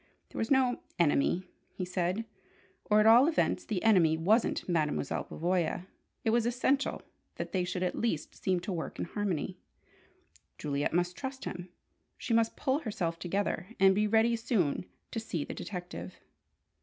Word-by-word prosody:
There - - -7
was 225 - -1
no 260 -2 +3 0.2
"enemy," 170 +2 +2 0.3
he 185 - -3
said, 180 +4 -1 0.6
or 210 0 +4
at 215 - +4
all 235 +5 +8
events 325 -3 +1
the 205 -6 -3
enemy 175 -8 +5
wasn't 210 +8 +2
Mademoiselle 155 -5 0
Pavoya. 175 0 -1 0.4
It 225 - +3
was 235 0 +2
essential 260 +3 0 0.3
that - - -5
they 185 -2 +1
should 180 0 -2
at 180 - 0
least 220 -10 -2
seem 185 -2 0
to 190 +2 -3
work 165 -2 -4
in - - -2
harmony. 185 -2 -2 1.0
Juliet 145 -1 -1
must 175 +1 0
trust 265 -1 -6
him. 180 0 -6 0.5
She 240 - -2
must 225 0 +3
pull 275 0 +1
herself 175 - -3
together, 180 0 -1
and 190 0 +6
be 210 +2 +2
ready 225 +2 +4
soon 210 - 0 0.2
to 225 - -2
see 175 -9 -3
the - - -6
detective. 180 -2 -6
190 Hz, 160 wpm, -31 LUFS, 175-225 Hz, 1.0 s, all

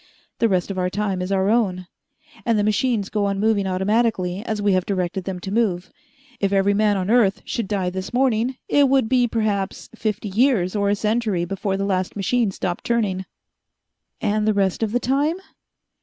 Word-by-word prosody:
The 230 - +3
rest 185 0 0
of 190 - -3
our 180 0 0
time 195 -1 -2
is 185 +2 -3
our 190 0 +2
own, 190 -6 +1 0.6
and 230 -2 +1
the 205 - +2
machines 215 0 +1
go 210 -1 -1
on 200 0 -1
moving 210 -2 +2
automatically 190 0 0
as 220 -3 -3
we 205 -1 +2
have 185 -1 +2
directed 185 -1 -2
them 190 -2 -4
to 190 - -5
move. 190 -6 0 0.5
If 200 -1 0
every 200 0 +3
man 210 0 +2
on 190 +2 -1
earth 225 -5 +3
should 230 -4 -3
die 190 -3 -1
this 190 +1 -5
morning, 250 0 +1
it 285 -2 +4
would 265 -4 +3
be 250 0 +3
perhaps 210 -4 -2
fifty 215 -1 -3
years 215 -3 +2
or 200 -1 +1
a 205 - +2
century 210 -4 0
before 195 +1 -2
the 195 - -1
last 185 -2 -1
machine 220 +3 +1
stopped 180 -2 -4
turning." 205 -6 0 0.9
"And 210 0 0
the 215 - +2
rest 195 -1 +1
of 220 -2 0
the 245 - +1
time?" 280 +6 +1
205 Hz, 195 wpm, -22 LUFS, 190-225 Hz, 0.9 s, it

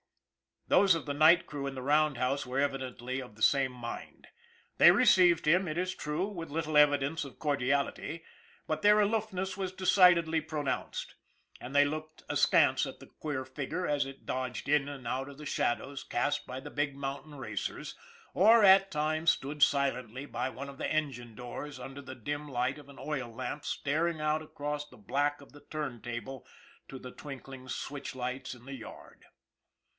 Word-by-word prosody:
Those 195 -3 +5
of 165 - -4
the 145 - -2
night 155 +4 +6
crew 140 -2 -5
in 135 - -5
the 130 - -5
roundhouse 140 -2 +2
were 125 +2 -4
evidently 130 -2 -2
of 125 -5 -11
the 110 - -17
same 135 -2 +3
mind. 120 -1 -8 0.5
They - - +9
received 175 -3 +5
him, 175 +4 +4
it 155 +1 -3
is 185 +1 -1
true, 150 +6 -2
with 170 -6 -6
little 155 0 -1
evidence 145 +1 +4
of 135 - -11
cordiality, 140 +3 -1 0.4
but 155 0 -1
their 210 +1 +6
aloof 215 0 +1
ness 190 +1 -2
was 190 -1 -3
decidedly 180 -4 +5
pronounced, 150 -3 -3 0.5
and 130 +3 -8
they 145 - +7
looked 155 +1 -5
ask - - +3
ance - - +4
at - - -9
the - - -12
queer 145 -4 -4
figure 140 +7 -4
as 145 -3 +1
it 135 0 -10
dodged 130 +1 -3
in 145 -1 +3
and 140 -3 -8
out 135 +1 -2
of 140 - -11
the 150 - -9
shadows 135 +1 -1
cast 145 +4 -1
by 130 - -5
the - - -9
big 145 -1 -1
mountain 140 +2 -5
racers, 110 -8 -5 0.4
or, 220 +4 +6
at 195 0 +7
times, 155 +1 +1
stood 145 +2 -5
silently 135 -3 +1
by 130 - -3
one 140 +2 -7
of 140 - -11
the - - -2
engine 130 -7 -2
doors 130 +4 -7
under 135 +3 -8
the 130 -1 -9
dim 145 +5 -4
light 130 +1 -1
of 145 - -14
an 140 - -13
oil 135 -5 -3
lamp 130 +5 -5
staring 155 +3 -1
out 155 +1 +1
across 150 -1 -4
the - - -17
black 145 +8 -1
of 140 - -15
the 145 - -15
turntable 120 -3 -5 0.4
to 135 - -8
the 125 -1 -9
twinkling 135 -2 -9
switch 140 +1 -5
lights 130 +1 -4
in 120 0 -17
the 140 - -7
yard. 125 -4 -11
145 Hz, 180 wpm, -31 LUFS, 130-155 Hz, 0.5 s, They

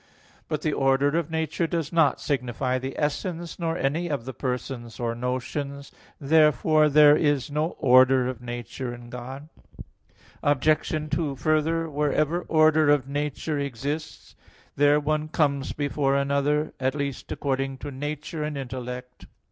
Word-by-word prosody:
But 155 -1 -3
the 155 - 0
order 135 +2 +2
of 170 -2 0
nature 160 +1 -1
does 165 -1 -3
not 160 -5 +3
signify 130 -1 -1
the 130 +1 -6
essence, 170 +4 -3
nor 165 -1 -1
any 155 +5 0
of 140 -6 -3
the 130 - -5
persons, 125 -3 -4
or 120 -1 -1
notions. 135 +3 -4 0.3
Therefore 155 +1 +4
there 150 0 +7
is 145 -2 +1
no 155 +3 -1
order 130 0 +5
of 125 -2 -5
nature 120 +1 -5
in 120 0 -13
God. 130 +4 -8 0.9
Obj. 150 +2 +1
2: 150 -2 -1
Further, 155 +4 +1
wherever 150 +3 0
order 155 -1 +4
of 145 -3 +3
nature 145 +1 -2
exists, 140 +4 -5 0.4
there 145 +1 +4
one 155 +1 -1
comes 140 -3 0
before 145 -1 0
another, 140 +2 +1
at 130 +1 0
least, 140 -2 -4
according 135 -1 -2
to 145 +2 -7
nature 150 +3 -5
and 150 -1 -3
intellect. 125 -1 -7
145 Hz, 140 wpm, -25 LUFS, 130-155 Hz, 0.9 s, there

